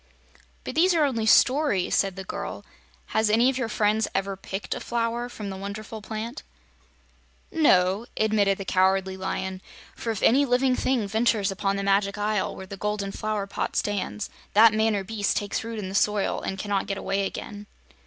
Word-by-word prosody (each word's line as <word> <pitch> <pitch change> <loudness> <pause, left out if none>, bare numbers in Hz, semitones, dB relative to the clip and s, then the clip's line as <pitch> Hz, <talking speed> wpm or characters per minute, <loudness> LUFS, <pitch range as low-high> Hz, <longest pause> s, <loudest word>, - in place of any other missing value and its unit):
"But - - -5
these 350 +3 +4
are 315 - +4
only 230 -5 -1
stories," 255 -5 +4
said 195 -2 +2
the 190 - -6
girl. - - -6 0.5
"Has 220 0 +3
any 235 +5 +4
of 260 - -5
your 235 -3 -1
friends 215 0 +1
ever 195 0 -1
picked 195 +1 -5
a - - -5
flower 235 +1 -2
from 210 -4 -6
the - - -5
wonderful 210 +3 -7
plant?" 220 +2 -5 1.1
"No," 200 - +3
admitted 210 -3 +2
the 195 - -6
Cowardly 190 0 +2
Lion, 190 0 -4 0.3
"for 230 - -5
if 220 -3 -2
any 270 +5 +5
living 255 0 +2
thing 250 -6 0
ventures 220 -1 +1
upon 195 +1 -1
the 200 - -2
Magic 200 +1 +1
Isle, 210 -1 -1
where 190 - -8
the 195 +1 -8
golden 210 -1 -2
flower 215 -1 -2
pot 200 - -4
stands, 205 0 -2 0.2
that 220 +1 +8
man 220 0 +2
or 195 - -1
beast 205 +1 -1
takes 205 +1 -2
root 230 0 -5
in 205 -3 -4
the 190 - -6
soil 205 0 +1
and 190 - -4
cannot 200 0 -1
get 195 - -2
away 195 0 -1
again." 205 0 -8
210 Hz, 185 wpm, -25 LUFS, 195-225 Hz, 1.1 s, that